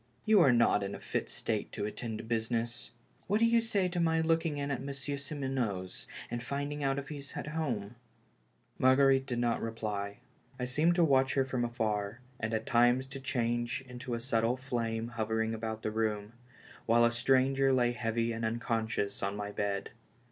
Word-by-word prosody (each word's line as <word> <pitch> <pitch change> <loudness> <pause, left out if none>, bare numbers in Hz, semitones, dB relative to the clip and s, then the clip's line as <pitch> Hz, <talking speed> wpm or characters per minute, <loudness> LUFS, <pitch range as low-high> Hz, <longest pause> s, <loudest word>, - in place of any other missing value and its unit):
You 215 -3 +6
are 140 - +6
not 120 -3 +4
in 100 0 -3
a - - -8
fit - - -3
state - - -2
to - - -2
attend 110 +1 -4
to - - -7
business. 115 +1 -2 0.4
What 205 +3 +2
do 230 - +5
you 230 0 +4
say 205 -5 +1
to 175 0 -2
my 160 -1 +3
looking 165 -1 +1
in 140 0 -2
at 130 - -2
Monsieur 140 +1 -4
Simoneau's 130 -10 -3 0.2
and 120 - -2
finding 145 +3 -3
out 135 0 +1
if 140 -1 -5
he's 140 -2 -7
at - - -4
home? 125 -10 -2 0.4
" - - -39
Marguerite 135 +1 +5
did 120 -3 -2
not 120 -1 +1
reply. 105 -3 -3 0.4
I 125 - -1
seemed 155 +7 +2
to 175 - +4
watch 135 -4 +3
her 135 -1 +3
from 130 -2 -1
afar, 110 -2 -1 0.2
and 110 0 -2
at 110 0 -1
times 120 +2 +4
to 135 0 -6
change 120 -1 -1
into 125 -1 -5
a - - -3
subtle 115 0 +1
flame 115 -3 -2
hovering 110 -1 -1
about 110 0 -4
the 110 - -1
room, 110 -1 -1 0.5
while 120 +1 +5
a 120 - +3
stranger 135 +2 +3
lay 120 -2 +3
heavy 115 -1 -1
and 115 0 -4
unconscious 110 -3 -1
on 100 +1 -1
my 105 0 -4
bed. 100 -1 -2
120 Hz, 190 wpm, -32 LUFS, 110-135 Hz, 0.5 s, You